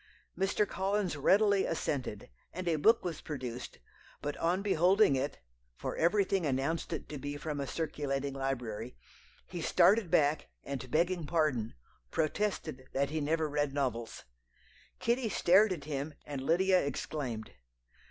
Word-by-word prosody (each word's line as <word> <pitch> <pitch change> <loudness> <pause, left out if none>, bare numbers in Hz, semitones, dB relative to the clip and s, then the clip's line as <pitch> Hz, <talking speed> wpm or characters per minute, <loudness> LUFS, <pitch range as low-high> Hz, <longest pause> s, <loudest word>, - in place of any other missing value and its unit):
Mr. 195 +2 +1
Collins 195 -2 -1
readily 200 +7 +4
assented, 130 - -3 0.2
and 185 +1 -5
a 165 -2 +2
book 225 +7 +4
was 170 -4 -3
produced; 125 -5 -6 0.4
but 145 0 -3
on 180 +4 +1
beholding 190 -3 +4
it 140 +2 -2 0.4
(for - - -4
everything 195 +2 +2
announced 145 +4 -1
it 160 - -4
to 150 - -6
be 145 +2 -4
from 150 -1 -4
a 140 - -2
circulating 140 -3 -2
library), 125 -4 -3 0.5
he - - -6
started 205 -3 +4
back, 150 0 +2 0.2
and 135 -2 -5
begging 170 +2 +1
pardon, 150 -9 0 0.3
protested 155 - -1
that 140 +1 0
he 155 0 -1
never 160 +2 +1
read 145 -1 -1
novels. 120 -5 -2 0.7
Kitty 235 0 0
stared 195 +3 +5
at 165 -6 -3
him, 145 0 -4
and 140 -2 -5
Lydia 185 +6 +3
exclaimed. 135 -5 -4
155 Hz, 140 wpm, -32 LUFS, 135-185 Hz, 0.7 s, stared